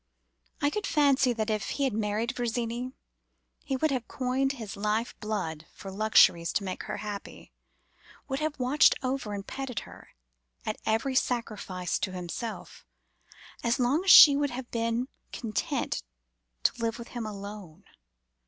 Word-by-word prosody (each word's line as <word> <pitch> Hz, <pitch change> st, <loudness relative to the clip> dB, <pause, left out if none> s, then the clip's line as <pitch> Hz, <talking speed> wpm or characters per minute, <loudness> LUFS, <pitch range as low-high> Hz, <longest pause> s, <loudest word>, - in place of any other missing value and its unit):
I 290 Hz, -, +3 dB
could 420 Hz, -, -2 dB
fancy 275 Hz, -3 st, +4 dB
that 220 Hz, -1 st, -1 dB
if 215 Hz, -1 st, -1 dB
he 280 Hz, -, 0 dB
had 265 Hz, -4 st, +1 dB
married 220 Hz, +4 st, -1 dB
Virginie, 240 Hz, +1 st, -2 dB, 0.7 s
he 270 Hz, -, -2 dB
would 310 Hz, +3 st, +1 dB
have 255 Hz, -4 st, -2 dB
coined 265 Hz, +1 st, 0 dB
his 225 Hz, -7 st, -7 dB
life 215 Hz, +3 st, -1 dB
blood 185 Hz, -8 st, -3 dB
for 195 Hz, -, -8 dB
luxuries 190 Hz, -5 st, +4 dB
to 205 Hz, -, 0 dB
make 185 Hz, -1 st, -4 dB
her 210 Hz, -, -4 dB
happy; 205 Hz, -1 st, -7 dB, 0.8 s
would 270 Hz, -1 st, -2 dB
have 310 Hz, -1 st, -2 dB
watched 260 Hz, +3 st, +5 dB
over 255 Hz, -4 st, -2 dB
and 195 Hz, -1 st, -6 dB
petted 270 Hz, -3 st, -4 dB
her, -, -, -14 dB, 0.5 s
at -, -, -3 dB
every 225 Hz, +5 st, +1 dB
sacrifice 215 Hz, -8 st, -1 dB
to 190 Hz, -, -2 dB
himself, 185 Hz, +6 st, -6 dB, 0.8 s
as 235 Hz, +2 st, +2 dB
long 265 Hz, +7 st, +2 dB
as 390 Hz, -, 0 dB
she 290 Hz, -5 st, +11 dB
would 285 Hz, 0 st, +1 dB
have 250 Hz, 0 st, -7 dB
been 230 Hz, +2 st, 0 dB, 0.2 s
content 225 Hz, -3 st, -2 dB, 0.6 s
to -, -, +1 dB
live 230 Hz, 0 st, -1 dB
with 235 Hz, -1 st, -9 dB
him 235 Hz, -3 st, -4 dB
alone. 200 Hz, -4 st, -9 dB
230 Hz, 155 wpm, -28 LUFS, 210-265 Hz, 0.8 s, she